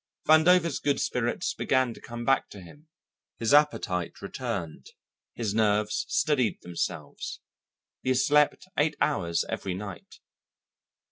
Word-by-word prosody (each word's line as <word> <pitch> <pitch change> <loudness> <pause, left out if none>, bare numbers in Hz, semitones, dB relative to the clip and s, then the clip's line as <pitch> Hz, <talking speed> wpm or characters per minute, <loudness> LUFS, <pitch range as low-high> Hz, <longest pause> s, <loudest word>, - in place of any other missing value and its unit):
Vandover's 165 0 +5
good 145 -1 0
spirits - - -1
began 130 -2 +1
to - - -15
come 120 0 -7
back 135 +1 +2
to 100 - -11
him, 145 - -15 0.5
his 115 +3 0
appetite 115 - +2
returned, 100 -6 -5 0.5
his 110 -4 -2
nerves 105 -1 +1
steadied 135 -7 +1
themselves, 85 -1 -4 0.6
he 130 - 0
slept 145 +6 +3
eight 150 +1 +2
hours 85 - 0
every 95 -2 -3
night. 100 -1 -9
120 Hz, 120 wpm, -27 LUFS, 100-145 Hz, 0.6 s, Vandover's